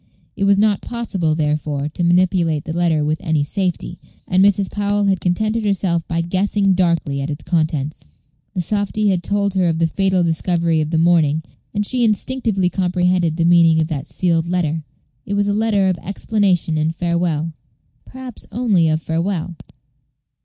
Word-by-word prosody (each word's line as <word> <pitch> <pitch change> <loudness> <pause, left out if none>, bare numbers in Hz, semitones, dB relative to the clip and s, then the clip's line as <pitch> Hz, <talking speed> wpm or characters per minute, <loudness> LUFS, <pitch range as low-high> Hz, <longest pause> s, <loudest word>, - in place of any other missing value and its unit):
It 200 - -1
was 200 0 +4
not 205 -1 +2
possible, 195 -10 -2
therefore, 150 -2 -1
to 175 - -4
manipulate 175 -3 +2
this 160 - -4
letter 165 -3 +1
with 155 +2 -1
any 155 -2 0
safety, 180 +4 -2 0.3
and 185 +1 +3
Mrs. 200 -1 +2
Powell 205 0 0
had 195 -3 +1
contented 215 +5 0
herself 185 -5 0
by 170 -1 -1
guessing 195 +3 +1
darkly 170 -6 0
at 140 - -3
its 145 0 -5
contents. 155 -4 -1 0.5
The 180 - 0
softy 205 +3 0
had 185 -3 +1
told 200 +2 -1
her 185 -3 +2
of 165 - -1
the 165 - +2
fatal 190 +2 +1
discovery 165 -1 +1
of 155 - -2
the 160 - 0
morning, 160 -2 +3 0.3
and 205 0 -1
she 250 +2 0
instinctively 220 -3 0
comprehended 180 -2 0
the 165 - +1
meaning 170 -2 +5
of 160 0 0
that 140 -4 -4
sealed 170 -3 0
letter. 165 -3 -1 0.4
It 200 - -2
was 205 0 +1
a 205 - 0
letter 210 -2 +1
of 185 -2 0
explanation 190 -5 0
and 160 +2 -1
farewell, 170 -2 -1 0.5
perhaps 260 -3 -10
perhaps 215 - -7
only 200 -9 +3
of 155 0 0
farewell. 170 +1 -2
175 Hz, 175 wpm, -19 LUFS, 160-200 Hz, 0.5 s, meaning